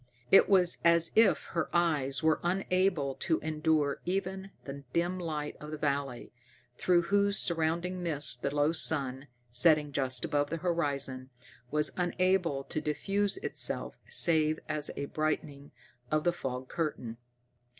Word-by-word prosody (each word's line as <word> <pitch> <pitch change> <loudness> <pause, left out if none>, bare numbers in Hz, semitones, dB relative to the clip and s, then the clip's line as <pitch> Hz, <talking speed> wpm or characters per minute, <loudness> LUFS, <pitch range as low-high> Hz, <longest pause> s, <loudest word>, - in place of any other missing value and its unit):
It - - +7
was 185 -3 +4
as 170 0 +4
if 220 -3 +4
her 170 - -1
eyes 150 -5 +1
were 160 -1 +3
unable 185 -5 0
to 160 - 0
endure 155 -2 0
even 190 +1 -3 0.2
the 140 0 -7
dim 175 +2 0
light 150 -4 -4
of 150 - -9
the 155 - -5
valley, 140 -4 -2 0.4
through 175 +5 +2
whose 200 +3 +1
surrounding 170 +2 -1
mists 150 -6 0
the 125 +3 -3
low 145 +2 +2
sun, 140 -4 0 0.2
setting 150 +4 +4
just 130 -1 -1
above 145 -3 0
the 165 - -2
horizon, 140 -6 -1 0.4
was 150 +2 +2
unable 180 -4 +1
to 155 - -4
diffuse 195 +7 -1
itself - - -2 0.2
save 155 -2 +2
as 150 -1 -1
a 140 - -2
brightening 145 -1 -3 0.4
of 155 0 +1
the 175 - +2
fog 130 -5 -5
curtain. 125 -9 -4
155 Hz, 140 wpm, -30 LUFS, 140-175 Hz, 0.4 s, It